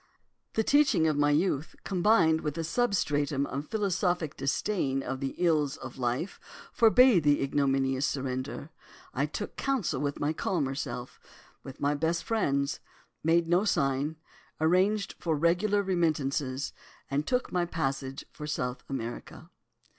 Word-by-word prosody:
The 220 Hz, -, +1 dB
teaching 285 Hz, -, +4 dB
of 155 Hz, -2 st, +2 dB
my 145 Hz, 0 st, +3 dB
youth, 150 Hz, -1 st, 0 dB
combined 175 Hz, -4 st, +3 dB
with 150 Hz, +1 st, -3 dB
a 165 Hz, -, -1 dB
substratum 150 Hz, -, 0 dB
of 140 Hz, +2 st, -5 dB
philosophic 180 Hz, -6 st, 0 dB
disdain 135 Hz, -1 st, -1 dB
of 130 Hz, +1 st, -4 dB
the 135 Hz, -1 st, -3 dB
ills 155 Hz, -5 st, +1 dB
of 130 Hz, 0 st, -9 dB
life, 125 Hz, +9 st, -2 dB, 0.3 s
forbade 235 Hz, -3 st, +6 dB
the 145 Hz, -1 st, +3 dB
ignominious 135 Hz, -1 st, +1 dB
surrender. 135 Hz, +3 st, -4 dB, 0.4 s
I 140 Hz, +3 st, 0 dB
took 205 Hz, +7 st, -5 dB
counsel 260 Hz, -, -1 dB
with 145 Hz, -1 st, -2 dB
my 145 Hz, +2 st, 0 dB
calmer 155 Hz, -5 st, -1 dB
self, 125 Hz, -2 st, -5 dB, 0.4 s
with 135 Hz, -, -10 dB
my 145 Hz, +1 st, +1 dB
best 165 Hz, +3 st, 0 dB
friends, 140 Hz, -11 st, 0 dB, 0.4 s
made 165 Hz, +1 st, +3 dB
no 175 Hz, +3 st, +3 dB
sign, 145 Hz, -5 st, 0 dB, 0.4 s
arranged 185 Hz, +6 st, +2 dB
for 165 Hz, -2 st, 0 dB
regular 180 Hz, +6 st, +2 dB
remittances, 145 Hz, -7 st, -1 dB, 0.4 s
and 145 Hz, +2 st, 0 dB
took 250 Hz, 0 st, 0 dB
my 175 Hz, -1 st, +1 dB
passage 135 Hz, -4 st, -3 dB
for 150 Hz, -, -8 dB
South 125 Hz, -4 st, -3 dB
America. 120 Hz, -3 st, -6 dB
150 Hz, 140 wpm, -29 LUFS, 135-180 Hz, 0.4 s, forbade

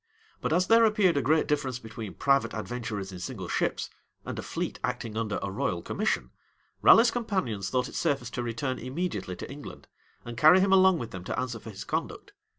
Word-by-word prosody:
But -, -, -1 dB
as 180 Hz, +3 st, +3 dB
there 230 Hz, +3 st, +6 dB
appeared 210 Hz, -5 st, +4 dB
a 140 Hz, -, +2 dB
great 155 Hz, +3 st, +3 dB
difference 145 Hz, -4 st, -1 dB
between 110 Hz, -3 st, -8 dB
private 140 Hz, -3 st, +2 dB
adventurers 110 Hz, -3 st, -4 dB
in 90 Hz, -, -8 dB
single 95 Hz, 0 st, -5 dB
ships, -, -, -1 dB, 0.4 s
and -, -, -5 dB
a -, -, -2 dB
fleet -, -, -4 dB
acting 110 Hz, -2 st, -3 dB
under 110 Hz, -2 st, -1 dB
a 100 Hz, -, -3 dB
royal 85 Hz, -3 st, -2 dB
commission, 60 Hz, 0 st, -1 dB, 0.5 s
Raleigh's 235 Hz, +1 st, +7 dB
companions 185 Hz, -, -2 dB
thought 125 Hz, +4 st, 0 dB
it -, -, -11 dB
safest 140 Hz, -7 st, -1 dB
to 125 Hz, -, -2 dB
return 120 Hz, +2 st, -3 dB
immediately 130 Hz, -, -3 dB
to -, -, -8 dB
England, 145 Hz, +1 st, -10 dB, 0.4 s
and 120 Hz, -1 st, -7 dB
carry 155 Hz, +6 st, +8 dB
him 195 Hz, 0 st, +3 dB
along 190 Hz, -1 st, +6 dB
with 115 Hz, -7 st, -6 dB
them 90 Hz, -1 st, -7 dB
to -, -, -2 dB
answer 125 Hz, -2 st, -3 dB
for 110 Hz, -, -10 dB
his 100 Hz, -, -7 dB
conduct. -, -, -4 dB
125 Hz, 200 wpm, -28 LUFS, 110-165 Hz, 0.5 s, carry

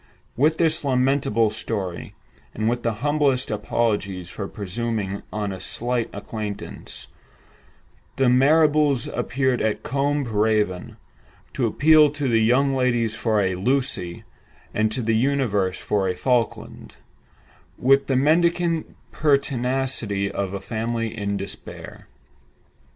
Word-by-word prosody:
With 155 Hz, +6 st, +2 dB
this 160 Hz, -1 st, +2 dB
lamentable 130 Hz, -4 st, +2 dB
story, 100 Hz, -5 st, -4 dB, 0.4 s
and 110 Hz, +1 st, -1 dB
with 120 Hz, +1 st, 0 dB
the 115 Hz, -, 0 dB
humblest 145 Hz, -4 st, +1 dB
apologies 105 Hz, -4 st, -1 dB
for 100 Hz, -, -5 dB
presuming 105 Hz, 0 st, -3 dB
on 105 Hz, -1 st, -2 dB
a 95 Hz, -, -7 dB
slight 120 Hz, 0 st, -1 dB
acquaintance, 105 Hz, 0 st, -6 dB, 1.1 s
the 135 Hz, -, +2 dB
Marrables 145 Hz, +1 st, +4 dB
appeared 130 Hz, -1 st, 0 dB
at 110 Hz, -1 st, -1 dB
Combe 140 Hz, +2 st, 0 dB
Raven, 105 Hz, -5 st, 0 dB, 0.6 s
to 125 Hz, -4 st, 0 dB
appeal 150 Hz, +6 st, +5 dB
to 145 Hz, -2 st, -2 dB
the 115 Hz, -2 st, +3 dB
young 135 Hz, +5 st, +3 dB
ladies 120 Hz, -4 st, +1 dB
for 110 Hz, -1 st, 0 dB
a 95 Hz, -1 st, 0 dB
"Lucy," 100 Hz, -4 st, -1 dB, 0.5 s
and 110 Hz, 0 st, +1 dB
to 125 Hz, +2 st, -2 dB
the 115 Hz, 0 st, +1 dB
universe 110 Hz, -7 st, +1 dB
for 100 Hz, -2 st, -1 dB
a 90 Hz, -, -1 dB
"Falkland," 120 Hz, +3 st, -2 dB, 0.8 s
with 135 Hz, +2 st, +3 dB
the 135 Hz, -, +1 dB
mendicant 165 Hz, +3 st, +2 dB, 0.2 s
pertinacity 130 Hz, -8 st, 0 dB
of 100 Hz, -1 st, -3 dB
a -, -, -3 dB
family 115 Hz, +2 st, -3 dB
in 100 Hz, -1 st, -2 dB
despair. 100 Hz, 0 st, -9 dB
120 Hz, 120 wpm, -23 LUFS, 105-135 Hz, 1.1 s, appeal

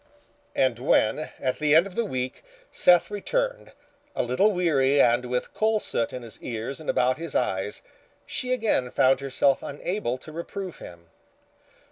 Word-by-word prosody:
And 130 Hz, -3 st, +2 dB
when, 130 Hz, +3 st, +2 dB
at 130 Hz, -1 st, -1 dB
the 150 Hz, 0 st, +3 dB
end 165 Hz, +3 st, +6 dB
of 200 Hz, -, -9 dB
the 235 Hz, +4 st, 0 dB
week, 130 Hz, -8 st, -4 dB, 0.3 s
Seth 175 Hz, +2 st, +4 dB
returned, -, -, -2 dB, 0.4 s
a -, -, +1 dB
little 130 Hz, -, +2 dB
weary 145 Hz, -7 st, +2 dB
and 120 Hz, 0 st, +4 dB
with 125 Hz, 0 st, -3 dB
coal 220 Hz, 0 st, +2 dB
soot 115 Hz, -, -2 dB
in 125 Hz, -, -7 dB
his 115 Hz, -2 st, -9 dB
ears 120 Hz, +4 st, -5 dB
and 155 Hz, -, -7 dB
about 130 Hz, +3 st, +2 dB
his 165 Hz, -3 st, -6 dB
eyes, 95 Hz, +2 st, -1 dB, 0.4 s
she 255 Hz, -, -4 dB
again 220 Hz, -, +1 dB
found 130 Hz, +1 st, +3 dB
herself 140 Hz, 0 st, +1 dB
unable 145 Hz, -, -3 dB
to 155 Hz, -, -12 dB
reprove 180 Hz, +3 st, -6 dB
him. 85 Hz, -1 st, -12 dB
140 Hz, 160 wpm, -26 LUFS, 125-185 Hz, 0.4 s, end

